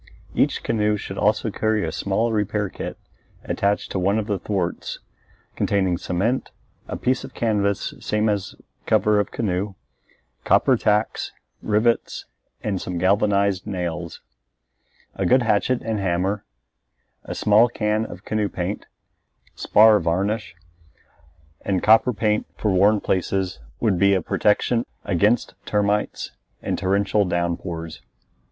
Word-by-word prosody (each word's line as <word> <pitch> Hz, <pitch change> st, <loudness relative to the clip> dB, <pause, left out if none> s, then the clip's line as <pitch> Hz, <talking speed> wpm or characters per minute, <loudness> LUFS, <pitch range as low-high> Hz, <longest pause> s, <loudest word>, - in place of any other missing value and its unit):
Each -, -, +1 dB
canoe 105 Hz, -2 st, +1 dB
should 95 Hz, -1 st, -6 dB
also 105 Hz, +1 st, +1 dB
carry 110 Hz, -2 st, 0 dB
a 80 Hz, -, -3 dB
small 100 Hz, +7 st, 0 dB
repair 105 Hz, -1 st, 0 dB
kit -, -, -6 dB, 0.5 s
attached 100 Hz, +1 st, -1 dB
to 95 Hz, -, -1 dB
one 100 Hz, +3 st, +2 dB
of 110 Hz, -, -1 dB
the 100 Hz, -3 st, -2 dB
thwarts, 95 Hz, -4 st, -3 dB, 0.6 s
containing 95 Hz, -4 st, +1 dB
cement, 110 Hz, +9 st, -1 dB, 0.4 s
a -, -, -4 dB
piece 130 Hz, +1 st, 0 dB
of -, -, -10 dB
canvas 100 Hz, -4 st, 0 dB
same 105 Hz, +1 st, 0 dB
as 100 Hz, -3 st, -1 dB, 0.3 s
cover 105 Hz, -1 st, +3 dB
of 100 Hz, -, -1 dB
canoe, 100 Hz, -2 st, -2 dB, 0.7 s
copper -, -, +4 dB
tacks, 105 Hz, +1 st, 0 dB, 0.3 s
rivets, 110 Hz, +2 st, 0 dB, 0.4 s
and 100 Hz, -4 st, -2 dB
some 90 Hz, -1 st, -4 dB
galvanized 100 Hz, +1 st, +2 dB
nails; 85 Hz, -3 st, -4 dB, 0.9 s
a 95 Hz, -, -3 dB
good 130 Hz, +6 st, +4 dB
hatchet 115 Hz, +3 st, +1 dB
and 110 Hz, -2 st, -2 dB
a -, -, -3 dB
hammer; 95 Hz, +2 st, -1 dB, 0.8 s
a -, -, -5 dB
small 110 Hz, +3 st, +5 dB
can 105 Hz, -1 st, 0 dB
of -, -, -9 dB
canoe 105 Hz, -2 st, 0 dB
paint, 90 Hz, +3 st, -4 dB, 0.7 s
spar 110 Hz, 0 st, +5 dB
varnish, 95 Hz, +4 st, -1 dB, 1.1 s
and 95 Hz, -2 st, -1 dB
copper 110 Hz, +4 st, +5 dB
paint 105 Hz, -1 st, 0 dB
for 105 Hz, -, 0 dB
worn 100 Hz, +3 st, +4 dB
places 95 Hz, 0 st, -1 dB, 0.2 s
would 105 Hz, -6 st, +1 dB
be 100 Hz, +1 st, +5 dB
a 95 Hz, -, +1 dB
protection 115 Hz, +6 st, +1 dB, 0.2 s
against 105 Hz, +5 st, +2 dB
termites 105 Hz, 0 st, -1 dB, 0.3 s
and -, -, -3 dB
torrential 100 Hz, +2 st, +2 dB
downpours. 85 Hz, -2 st, -3 dB
100 Hz, 130 wpm, -23 LUFS, 95-110 Hz, 1.1 s, small